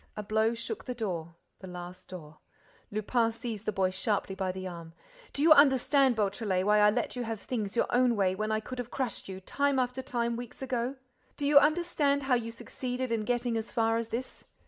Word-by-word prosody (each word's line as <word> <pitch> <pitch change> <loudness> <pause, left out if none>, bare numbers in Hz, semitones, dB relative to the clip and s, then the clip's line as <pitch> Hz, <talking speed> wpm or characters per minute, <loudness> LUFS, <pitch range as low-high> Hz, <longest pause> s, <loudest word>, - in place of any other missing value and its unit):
A 210 - -3
blow 220 +2 +1
shook 315 - -6
the 250 - -4
door, 170 -7 -4 0.2
the 190 - -9
last 180 0 -9
door— 155 -5 -10 0.5
Lupin 225 +2 +1
seized 225 -2 -6
the - - +2
boy 190 -2 +1
sharply 200 0 -1
by 190 -1 -2
the 185 0 -6
arm: 170 -2 -9 0.4
"Do 285 - -1
you 320 - +5
understand, 275 -2 +5
Beautrelet, 200 -2 0
why 210 +1 +4
I 210 0 +6
let 240 +4 -1
you 250 - -3
have 225 -2 -4
things 215 -3 -4
your - - +3
own 245 -1 +3
way 190 -3 +2
when 215 +3 -2
I 215 0 +1
could 255 +3 -7
have 245 -1 -4
crushed 255 -7 -3
you, 190 0 -6
time 280 +8 0
after 250 0 0
time, 235 -2 -1
weeks 245 +2 -8
ago? 250 0 -2 0.4
Do 285 - -2
you 285 0 +8
understand 295 -2 +2
how 265 -1 +1
you 235 -2 +1
succeeded 250 +2 -4
in 220 -2 0
getting 245 0 0
as 225 0 -3
far 225 -1 +2
as 230 -1 -2
this? 240 +3 -5
230 Hz, 215 wpm, -30 LUFS, 200-255 Hz, 0.5 s, you